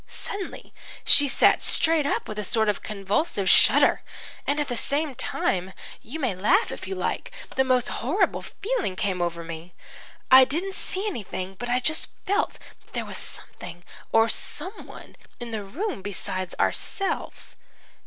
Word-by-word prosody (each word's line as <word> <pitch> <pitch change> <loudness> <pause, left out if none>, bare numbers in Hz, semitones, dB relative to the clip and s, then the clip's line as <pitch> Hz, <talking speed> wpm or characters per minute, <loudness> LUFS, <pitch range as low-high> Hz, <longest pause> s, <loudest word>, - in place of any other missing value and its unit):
"Suddenly 400 -2 -6 0.3
she 290 - +7
sat 270 - +4
straight 320 -3 +3
up - - -1
with 215 -1 -5
a - - -1
sort 220 +2 +1
of 205 - 0
convulsive 205 - -1
shudder, - - +6 0.5
and 290 +1 +1
at 295 - 0
the 245 - -2
same 285 +4 0
time 190 -5 -1 0.3
you 300 +8 -7
may 255 -8 0
laugh 280 - +3
if - - -6
you 385 - -3
like - - -2 0.3
the 265 - +4
most 255 -2 +2
horrible 345 - 0
feeling 420 - -2
came 185 -2 -1
over 170 -1 -1
me. 165 +1 -8 0.6
I 260 0 +11
didn't 335 +9 -2
see 385 +1 -3
anything, 195 - -4
but 245 +6 -6
I 245 +1 +3
just 310 +5 -1 0.2
felt 405 +3 +1 0.3
that - - -27
there - - -2
was - - -5
something 175 - -9 0.3
or 225 0 +5
someone 355 - -6 0.2
in 240 -1 -6
the 215 -2 -3
room 300 - -4
besides 185 -2 -4
ourselves. 390 -1 -1
245 Hz, 160 wpm, -26 LUFS, 195-320 Hz, 0.6 s, I